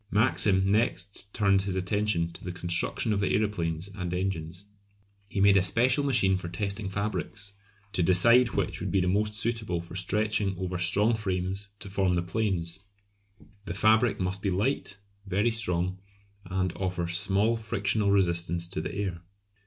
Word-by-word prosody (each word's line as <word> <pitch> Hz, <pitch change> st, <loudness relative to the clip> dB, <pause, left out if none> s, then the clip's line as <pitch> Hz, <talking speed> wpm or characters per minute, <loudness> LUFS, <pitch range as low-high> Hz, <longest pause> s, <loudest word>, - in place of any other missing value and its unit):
Maxim 100 Hz, -4 st, +3 dB
next 100 Hz, -2 st, -1 dB
turned 100 Hz, -2 st, +3 dB
his 95 Hz, -1 st, -3 dB
attention 95 Hz, -2 st, 0 dB
to -, -, -11 dB
the 90 Hz, -, -4 dB
construction 85 Hz, +5 st, 0 dB
of 100 Hz, -, 0 dB
the 100 Hz, -2 st, +1 dB
aeroplanes 85 Hz, -5 st, -1 dB
and 90 Hz, -3 st, -5 dB
engines. 90 Hz, -1 st, -3 dB, 0.6 s
He 100 Hz, -, -4 dB
made 100 Hz, 0 st, +6 dB
a -, -, +5 dB
special 125 Hz, +9 st, +2 dB
machine 95 Hz, -9 st, +3 dB
for 85 Hz, -, -6 dB
testing 100 Hz, +2 st, -3 dB
fabrics, 105 Hz, +1 st, -3 dB, 0.4 s
to 95 Hz, -, +1 dB
decide 115 Hz, +8 st, +5 dB
which -, -, -1 dB
would -, -, -3 dB
be 95 Hz, -2 st, +1 dB
most 105 Hz, +3 st, 0 dB
suitable 110 Hz, -5 st, -1 dB
for 85 Hz, +1 st, -9 dB
stretching 100 Hz, +1 st, 0 dB
over 90 Hz, -1 st, -3 dB
strong 100 Hz, +6 st, +3 dB
frames 95 Hz, -2 st, -3 dB
to -, -, -8 dB
form 95 Hz, -2 st, +1 dB
the 85 Hz, -, 0 dB
planes. 90 Hz, -3 st, -2 dB, 0.9 s
The 85 Hz, -, -5 dB
fabric 110 Hz, +3 st, +3 dB
must 95 Hz, +1 st, -2 dB
be 100 Hz, -, 0 dB
light, 100 Hz, +1 st, -1 dB, 0.3 s
very 100 Hz, +5 st, +1 dB
strong, 95 Hz, -4 st, 0 dB, 0.5 s
and 95 Hz, -1 st, -1 dB
offer 90 Hz, -2 st, -2 dB
small 100 Hz, +5 st, +1 dB
frictional 105 Hz, -2 st, -1 dB
resistance 85 Hz, -3 st, +1 dB
to 95 Hz, -, -3 dB
the -, -, -5 dB
air. 95 Hz, -4 st, -3 dB
95 Hz, 160 wpm, -28 LUFS, 90-105 Hz, 0.9 s, made